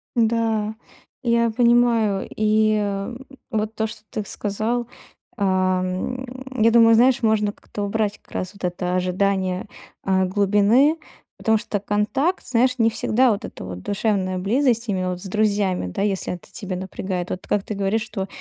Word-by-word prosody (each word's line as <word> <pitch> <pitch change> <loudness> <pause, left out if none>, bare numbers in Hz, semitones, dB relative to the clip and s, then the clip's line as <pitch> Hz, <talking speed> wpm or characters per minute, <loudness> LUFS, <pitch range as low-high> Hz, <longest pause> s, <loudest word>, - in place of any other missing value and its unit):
Да, 225 -2 +1 0.5
я 235 -1 +3
понимаю, 235 -3 +3
и, 215 0 +3
эм, 205 +5 -3 0.2
вот 220 -2 -2
то, 220 0 0
что 215 0 -9
ты 215 - -3
сказал, 220 +5 -2 0.5
а, 185 -2 +2
м, 255 +6 -4
я 225 - +6
думаю, 230 0 +6
знаешь, 250 +2 +4
можно 215 -2 +2
как-то 205 0 -7
убрать 210 0 -1
как - - -28
раз 185 - -3
вот 200 - -16
это 180 0 -1
ожидание, 185 0 0 0.4
а, 190 -1 +2
глубины, 205 - +3 0.4
потому 220 0 +2
что 210 -1 -3
контакт, 210 - 0
знаешь, 250 +1 +2
не 225 -2 +4
всегда 245 +3 +2
вот 205 - -2
эта - - -8
вот 90 -1 -7
душевная 195 - -1
близость 235 +4 +1
именно 185 -2 -1
вот 180 -1 -4
с - - -6
друзьями, 200 - 0
да, 90 - -3
если 195 -3 0
это 180 - -10
тебя 195 -4 -4
напрягает. 185 -1 -4
Вот 185 - -5
как 205 - +1
ты 215 - -5
говоришь, 200 +2 0
что 195 -4 -5
210 Hz, 165 wpm, -22 LUFS, 190-230 Hz, 0.5 s, я